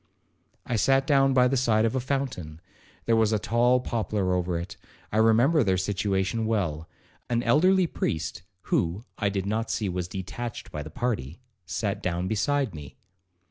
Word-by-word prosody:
I 115 - -1
sat 135 +5 +3
down 135 -2 +3
by 125 -1 +5
the 135 - 0
side 115 -4 +2
of 115 - 0
a - - +2
fountain,—there 115 - -4
was 110 -1 +3
a 110 - +2
tall 120 +5 +2
poplar 105 -6 -1
over 90 -1 0
it,—I 90 +4 -8
remember 120 +8 +4
their 95 -3 +2
situation 100 +3 -1
well. 85 -8 -1 0.4
An 120 0 +1
elderly 180 +10 +4
priest 80 - -3 0.3
(who, 90 +6 +1 0.2
I 100 - +1
did 95 -1 -2
not 110 +2 -1
see, 105 -3 -1
was 90 -1 -3
detached 105 +6 -6
by 75 - -4
the 75 - -8
party) 85 - -3 0.3
sat 100 0 -2
down 90 -1 -1
beside 130 +4 0
me. 75 -3 -10
110 Hz, 160 wpm, -26 LUFS, 90-125 Hz, 0.4 s, by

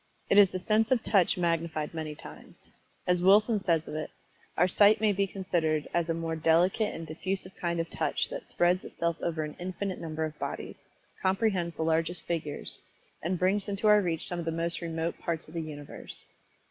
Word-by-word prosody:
It 200 - +7
is 200 -2 +8
the 185 - -3
sense 215 +4 +1
of 250 -3 +2
Touch 190 -5 +3
magnified 165 -3 -1
many 155 -2 -4
times. - - -13 0.4
As 180 -1 +2
Wilson 210 +4 +5
says 170 -5 +1
of - - -6
it, 155 0 -3 0.5
"Our 180 - +5
sight 205 +3 +5
may 215 -1 +3
be 200 0 +1
considered 165 -6 -1
as 170 -1 +1
a 165 - +1
more 165 0 -2
delicate 175 +7 +2
and 165 - -6
diffusive 185 +4 -2
kind 170 -1 -2
of 165 - -1
touch - - 0
that - - -6
spreads 175 +1 +2
itself 170 -1 -2
over 160 -2 -1
an 150 -1 -6
infinite 185 +1 -4
number 160 -1 -2
of 155 -1 -7
bodies; - - -5 0.4
comprehends 190 -3 +1
the 160 - -2
largest 165 +2 0
figures, 155 -4 -4 0.4
and 180 +3 -1
brings 195 +3 +1
into 200 +1 -3
our 210 0 +7
reach 170 -4 0
some 175 - -1
of 170 - -4
the 165 - 0
most 165 +2 -1
remote 165 0 -3
parts 165 -2 -3
of 155 - -14
the 165 - -2
universe." 145 -2 -8
170 Hz, 200 wpm, -29 LUFS, 160-190 Hz, 0.5 s, is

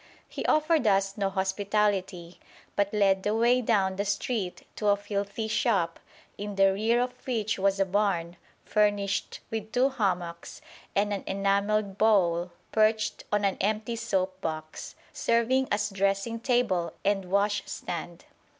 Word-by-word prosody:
He - - -6
offered 310 -4 +3
us 195 -1 +2
no 200 -2 0
hospitality 190 -2 -1 0.4
but 200 0 +1
led 195 -2 +3
the 210 +2 0
way 240 +2 +3
down 195 -5 +1
the 200 - 0
street 205 -1 -2
to 210 - -1
a 205 0 +4
filthy 205 +2 -3
shop, 205 -6 +1 0.4
in 205 0 -5
the 195 0 +4
rear 225 +4 +2
of 250 0 -1
which 225 -4 -1
was 195 0 +2
a 195 - +3
barn, 180 -3 0 0.3
furnished 205 -2 0
with 220 -1 -4
two 255 +3 +3
hammocks 180 -9 -3 0.4
and 205 +1 +2
an 200 - -3
enamelled 200 +1 0
bowl 180 -5 +3 0.2
perched 215 -1 +1
on 205 -1 +2
an 195 - 0
empty 215 +3 -1
soap 190 -5 -2
box, 155 -2 -5 0.2
serving 240 +3 +2
as 210 0 0
dressing 195 +4 0
table 230 -8 +1
and 195 -1 +1
washstand. 195 -3 -2
200 Hz, 140 wpm, -28 LUFS, 195-220 Hz, 0.4 s, a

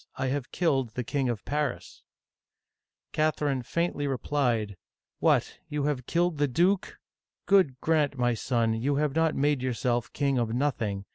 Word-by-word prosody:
I 130 - -1
have 135 -1 -3
killed 135 -10 0
the 125 - -2
King 135 +1 -1
of 115 -3 -4
Paris! 145 -3 -3 0.5
'* - - -62
Catherine 150 -3 0
faintly 160 +2 -1
replied: 125 -6 0 0.2
" - - -63
What, - - +2
you 150 -1 -2
have, 140 -4 -1
killed 170 -2 +1
the 145 - +3
duke! 180 +9 +1 0.5
God 185 -10 +3
granf, 155 -3 +2
my 120 -1 +1
son, 115 -1 0
you 130 +6 0
have 145 -1 0
not 160 0 +2
made 145 -1 +1
yourself 120 -1 -1
king 140 -2 0
of 115 -1 -1
nothing. 115 -8 -1
140 Hz, 160 wpm, -28 LUFS, 120-150 Hz, 0.5 s, the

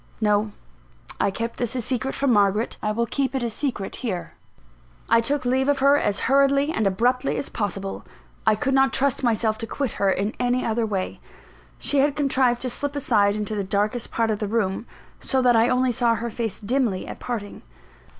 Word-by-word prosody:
No: 210 0 +2 0.7
I - - +2
kept 230 +4 -4
this 240 0 -2
a - - 0
secret 260 +2 -2
from 275 -3 +2
Margaret; 205 +2 +2
I 210 - 0
will 235 +2 0
keep 270 +2 -1
it 260 - -1
a 235 - -1
secret 235 -6 -4
here. 195 -9 -4 0.7
I 230 0 +4
took 280 +3 -1
leave 260 +2 +2
of 285 - +3
her 275 +1 +5
as 205 -8 0
hurriedly 275 +2 +3
and 220 -8 +1
abruptly 245 +7 +1
as - - -3
possible 195 -2 -3 0.4
I 220 - +4
could 270 +6 -1
not 270 0 +3
trust 275 -1 +1
myself 220 -2 +1
to 225 - -4
quit 275 -2 -2
her 200 - +4
in 200 +3 0
any 245 +1 +1
other 225 0 0
way. 195 -3 -3 0.6
She 285 - 0
had 285 +1 +2
contrived 260 -4 +2
to 255 - -1
slip 285 +3 -4
aside 205 -7 +2
into 215 0 -2
the 205 -1 -1
darkest 210 +5 -1
part 225 -1 0
of 210 - -2
the 210 - -2
room, 210 0 -1 0.3
so 265 - +1
that 245 -1 +5
I 225 +2 +4
only 255 0 +2
saw 235 -1 +2
her 235 +1 -4
face 225 -3 -3
dimly 230 -3 0
at - - -8
parting. 220 -5 -5
235 Hz, 200 wpm, -24 LUFS, 210-265 Hz, 0.7 s, her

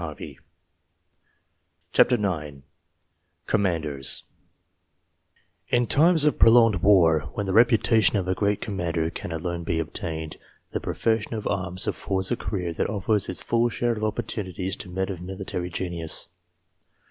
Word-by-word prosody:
134 125 0 +5
COMMANDERS 75 -7 -4 0.8
COMMANDEKS 80 -8 0 1.4
IN 120 0 +2
times 160 +5 +4
of 150 - +2
prolonged 115 -3 +6
war, 85 -6 +4
when 105 - -2
the 95 - -2
reputation 110 -2 +4
of 95 -2 -2
a 95 - +2
great 100 +1 0
commander 85 -6 -2
can 85 - -7
alone 85 +1 -3
be 85 0 -1
obtained, 80 0 -4 0.3
the - - -2
profession 115 0 -1
of 110 - -5
arms 90 -1 -1
affords 95 -1 -2
a - - +3
career 90 -7 -3
that - - -1
offers 105 0 0
its 95 - -5
full 120 +1 +2
share 120 0 0
of 110 -1 -5
opportunities 100 -4 -3
to - - -8
men 95 +2 -2
of 90 -2 -7
military 90 -1 -4
genius. 85 -2 -4
95 Hz, 135 wpm, -25 LUFS, 85-110 Hz, 1.4 s, prolonged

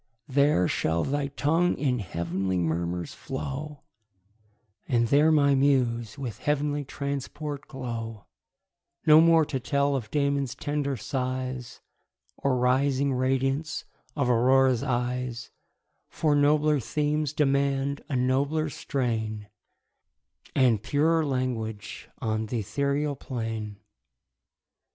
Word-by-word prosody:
There 140 - +3
shall 80 +1 0
thy 140 0 -1
tongue 160 +5 +1
in 130 -4 0
heav'nly 90 0 -2
murmurs 85 +1 -2
flow, 140 +2 -6 1.0
And 120 -2 +2
there 150 +4 +5
my 140 -2 +4
muse 125 -5 +1
with 125 -6 -5
heav'nly 145 0 0
transport 140 +1 -5
glow: 115 -6 -6 0.8
No 155 0 +8
more 165 -1 +5
to 135 -2 -3
tell 140 +2 +1
of 115 -5 -4
Damon's 140 -3 0
tender 145 -2 -2
sighs, 130 +1 -4 0.5
Or 135 -2 0
rising 135 +2 +2
radiance 135 +4 0 0.3
of 140 -4 0
Aurora's 125 +1 +4
eyes, 125 -2 -2 0.6
For 155 -2 +1
nobler 150 +1 +3
themes 150 +3 -1
demand 140 -1 +1
a 140 - -1
nobler 140 +5 +1
strain, 110 -6 -3 1.1
And 120 -6 +4
purer 155 +7 +2
language 125 -6 -3
on 110 0 -2
th' - - -8
ethereal 140 +7 -1
plain. 110 -5 -5
135 Hz, 105 wpm, -27 LUFS, 120-145 Hz, 1.1 s, No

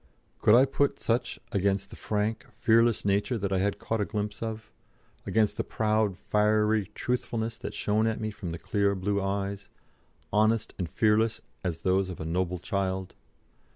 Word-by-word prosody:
Could 105 - +6
I 130 +3 +7
put 140 +1 0
such 120 +2 -1
against 100 -1 0
the - - -9
frank, 105 +1 -2
fearless 115 -1 +3
nature 100 +5 +1
that 100 -2 -2
I 95 - +2
had 100 +1 0
caught 115 -1 -2
a - - +1
glimpse 105 +1 -4
of, 110 -1 -5 0.6
against 110 -2 +2
the - - 0
proud 110 -3 0
fiery 105 0 +2
truthfulness 115 -2 -2
that 105 -4 -6
shone 105 +2 +1
at 110 - -1
me 110 0 -2
from 100 -5 -6
the 85 - -4
clear, 100 +3 +1
blue 100 +2 0
eyes, 100 0 -3 0.6
honest 110 +1 +2
and 90 -3 -2
fearless 110 +2 +2 0.2
as 85 -4 -3
those 95 0 +2
of 90 - -7
a 80 - -4
noble 90 +2 -1
child? 95 0 -2
105 Hz, 170 wpm, -28 LUFS, 95-110 Hz, 0.6 s, I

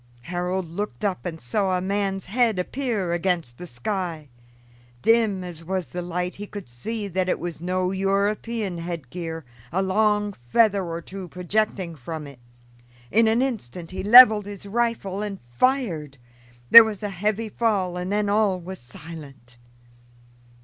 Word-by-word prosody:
Harold 180 +5 -2
looked 170 -6 -4
up 185 -2 -2
and 165 -2 -6
saw 185 - 0
a - - -1
man's 195 0 -1
head 225 +1 +1
appear 205 -3 -2
against 170 -8 -1
the 180 - -7
sky. 165 - -4 0.7
Dim 225 -5 +3
as 170 -2 -8
was 185 -4 -3
the 180 - -4
light, 180 +1 -3
he 205 +1 -7
could 205 -2 -8
see 205 - -5
that 185 0 -1
it - - +1
was 170 -2 -5
no 185 +1 0
European 200 0 -1
head 165 -6 -6
gear, 165 -3 -5 0.3
a 180 - 0
long 210 +1 +1
feather 195 - +2
or 170 -1 -4
two 190 +1 -8
projecting 180 0 -1
from 155 +3 -6
it. 140 -3 -12 0.7
In 225 +2 +4
an 225 +3 +3
instant 180 - -4
he 185 - -4
leveled 215 -1 +8
his 200 -1 -8
rifle 210 -3 -1
and 205 -2 -4
fired. 165 - 0 0.5
There 230 - +13
was 215 -2 -5
a 205 - -1
heavy 210 +4 -2
fall 200 -5 0
and 180 +1 -4
then 210 0 +1
all 200 -2 +2
was 185 +2 -8
silent. 135 -1 -11
190 Hz, 155 wpm, -24 LUFS, 170-210 Hz, 0.7 s, There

